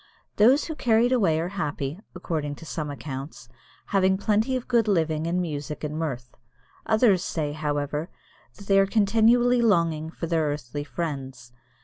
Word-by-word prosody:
Those 250 Hz, +8 st, +5 dB
who 320 Hz, -, -4 dB
are -, -, -11 dB
carried 235 Hz, -2 st, +2 dB
away 190 Hz, -11 st, +2 dB
are 170 Hz, +2 st, -2 dB
happy, 150 Hz, -4 st, -3 dB, 0.2 s
according 155 Hz, -5 st, -3 dB
to 165 Hz, -, -12 dB
some 155 Hz, -2 st, -4 dB
accounts, 135 Hz, -2 st, -7 dB, 0.4 s
having 190 Hz, -1 st, +3 dB
plenty 215 Hz, +5 st, +1 dB
of 255 Hz, -, -4 dB
good 235 Hz, -3 st, +2 dB
living 160 Hz, -5 st, +1 dB
and 175 Hz, +2 st, 0 dB
music 150 Hz, -4 st, -4 dB
and 150 Hz, 0 st, -3 dB
mirth. 130 Hz, -6 st, -4 dB, 0.5 s
Others 220 Hz, -4 st, +3 dB
say, 150 Hz, -5 st, -2 dB
however, 150 Hz, +1 st, -2 dB, 0.5 s
that 200 Hz, -, -13 dB
they 195 Hz, 0 st, +4 dB
are 195 Hz, -, +4 dB
continually 230 Hz, +4 st, +3 dB
longing 165 Hz, -8 st, +2 dB
for 165 Hz, -, -6 dB
their 165 Hz, -1 st, +1 dB
earthly 145 Hz, -1 st, -4 dB
friends. 135 Hz, -6 st, -5 dB
165 Hz, 160 wpm, -25 LUFS, 150-210 Hz, 0.5 s, Those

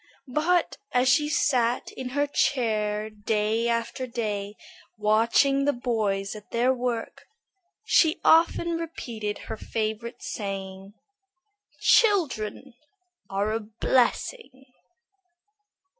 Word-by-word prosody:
But 340 Hz, +4 st, +1 dB, 0.2 s
as 250 Hz, +1 st, +3 dB
she 295 Hz, +4 st, +3 dB
sat 245 Hz, -5 st, +1 dB
in 255 Hz, -1 st, -6 dB
her 290 Hz, -, +3 dB
chair 215 Hz, -7 st, 0 dB
day 215 Hz, +2 st, 0 dB
after 235 Hz, +2 st, -2 dB
day 210 Hz, -4 st, -3 dB, 0.4 s
watching 230 Hz, +6 st, +3 dB
the 290 Hz, -, +2 dB
boys 215 Hz, -5 st, -1 dB
at 210 Hz, -1 st, -12 dB
their 245 Hz, +3 st, +2 dB
work, 245 Hz, -2 st, -4 dB, 0.6 s
she 320 Hz, -7 st, +3 dB
often 335 Hz, +1 st, +4 dB
repeated 230 Hz, -11 st, -5 dB
her -, -, -5 dB
favorite 220 Hz, +2 st, -4 dB
saying, 195 Hz, -1 st, -6 dB, 0.8 s
"Children 275 Hz, -, +2 dB, 0.6 s
are 200 Hz, +2 st, -1 dB
a 225 Hz, -, 0 dB
blessing." 260 Hz, -, -1 dB
235 Hz, 100 wpm, -26 LUFS, 210-270 Hz, 0.8 s, often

